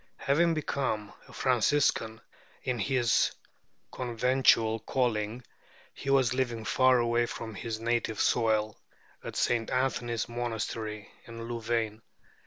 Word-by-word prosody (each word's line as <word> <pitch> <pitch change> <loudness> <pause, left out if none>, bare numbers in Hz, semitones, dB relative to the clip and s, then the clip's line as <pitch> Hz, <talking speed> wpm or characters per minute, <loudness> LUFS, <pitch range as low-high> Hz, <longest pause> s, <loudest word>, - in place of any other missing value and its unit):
Having 165 +4 +2
become 130 -8 -2
a - - -15
Franciscan, 115 -2 +1 0.4
in 125 -2 -1
his 120 -1 +2 0.6
conventual 120 -2 +2
calling 115 -1 -1 0.5
he 135 - -6
was 135 -3 +4
living 120 -4 -2
far 130 +5 +4
away 120 0 +2
from 110 -1 -6
his 110 +2 -5
native 115 -2 -1
soil, 110 -2 +1 0.4
at - - -7
St. 115 -2 +1
Anthony's 125 -3 -1
monastery 110 -2 -4
in 115 0 -8
Louvain. 115 -2 -2
120 Hz, 110 wpm, -29 LUFS, 110-125 Hz, 0.6 s, was